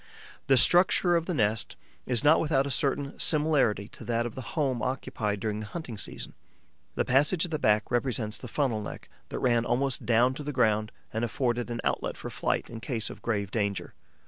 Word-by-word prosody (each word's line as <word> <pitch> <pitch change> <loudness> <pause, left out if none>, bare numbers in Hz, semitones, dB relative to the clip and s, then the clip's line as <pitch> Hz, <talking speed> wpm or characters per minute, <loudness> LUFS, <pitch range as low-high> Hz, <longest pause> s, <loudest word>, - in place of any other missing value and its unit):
The 135 - +5
structure 175 +4 +5
of 165 -1 0
the 180 - -1
nest 110 -2 0 0.3
is 125 +1 +2
not 150 +2 +6
without 140 -4 +2
a 140 - -3
certain 140 +2 -1
similarity 145 - +2
to - - -12
that 115 0 0
of 120 - -5
the 130 - -6 0.2
home 130 -6 +1
occupied 110 -5 -2
during 105 0 -2
the 110 - -6
hunting 155 -4 -6
season. - - -6 0.6
The - - 0
passage 150 +7 +3
at 175 - -9
the 155 - -1
back 105 -5 +2
represents 120 -3 -1
the 125 - -8
funnel 120 -3 0
neck, 105 - -8 0.2
that - - -4
ran 120 -2 +2
almost 130 +2 0
down 120 +2 +4
to 150 - -7
the 145 - -3
ground 110 -5 +1 0.2
and 110 +1 -1
afforded 120 +1 -1
an 120 -1 -3
outlet - - -1
for - - -7
flight - - -1
in 115 - -8
case 115 -1 -3
of - - -11
grave 100 -4 -2
danger. 100 -3 -2
120 Hz, 200 wpm, -28 LUFS, 110-140 Hz, 0.6 s, not